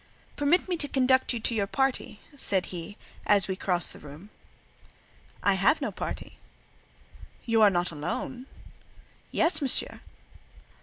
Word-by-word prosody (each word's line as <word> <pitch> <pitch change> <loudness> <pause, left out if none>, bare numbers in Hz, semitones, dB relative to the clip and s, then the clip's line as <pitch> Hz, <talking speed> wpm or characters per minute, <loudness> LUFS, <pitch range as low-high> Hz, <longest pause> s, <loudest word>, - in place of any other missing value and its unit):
"Permit 295 +7 +1
me 360 -2 -2
to 295 - 0
conduct 260 -1 +2
you 240 - -2
to 235 - -1
your 205 -3 0
party," 265 -3 -2
said 195 -9 +3
he, 175 +3 -7 0.3
as 200 -3 +4
we 190 - -2
crossed 180 -3 0
the - - -12
room. 150 +8 -13 1.1
"I - - +3
have - - +2
no - - -3
party." - - -7 1.1
"You 230 -1 +2
are 210 - +7
not 175 -2 0
alone?" 245 - -5 0.8
"Yes, 330 -1 +3
Monsieur." 270 -3 +2
220 Hz, 140 wpm, -27 LUFS, 185-270 Hz, 1.1 s, are